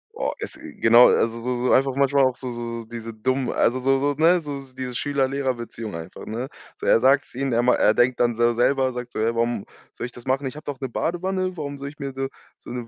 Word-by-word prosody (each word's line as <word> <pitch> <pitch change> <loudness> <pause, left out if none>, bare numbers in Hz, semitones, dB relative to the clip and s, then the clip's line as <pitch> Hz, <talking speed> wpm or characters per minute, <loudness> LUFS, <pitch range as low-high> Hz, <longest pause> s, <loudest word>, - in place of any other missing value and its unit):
Boah, - - -1
es - - -6
genau, 120 - +5
also, 115 +1 +2
so 125 +1 -2
so 125 +1 +1
einfach 135 0 +3
manchmal 140 0 +3
auch 130 -1 +2
so 125 -1 -5
so 115 -1 -5
diese 115 0 -7
dummen 130 +3 0
also, 125 +3 +2
so 135 +1 +2
so, 145 +2 +1
ne 165 +5 +4
so 145 -3 -5 0.2
diese 130 -1 -5
Schüler-Lehrer-Beziehung 130 -6 -2
einfach, 85 +2 -9
ne? 120 +5 -4 0.3
So, - - -8
er - - +5
sagt's 135 +3 +3
ihm, 135 +1 -2
er 120 +1 +2
ma 125 - +4
er 110 - +3
denkt 125 +1 +2
dann 120 -1 +2
so 120 +1 +3
selber, 130 +2 +2
sagt 125 0 -6
so: - - -8
„Ja, 110 +2 +1
warum 115 -2 -1 0.3
soll - - -6
ich 125 - -7
das 120 +1 -13
machen? 135 +2 +1
Ich 130 - -4
habe 150 - -10
doch 140 -3 -5
'ne 135 - -2
Badewanne, 185 +6 -2
warum 145 -2 -5
soll 140 +1 -5
ich 145 - -15
mir 140 -1 -5
so 135 0 -2 0.3
so - - -13
'ne 120 -1 -5
130 Hz, 245 wpm, -23 LUFS, 120-140 Hz, 0.3 s, genau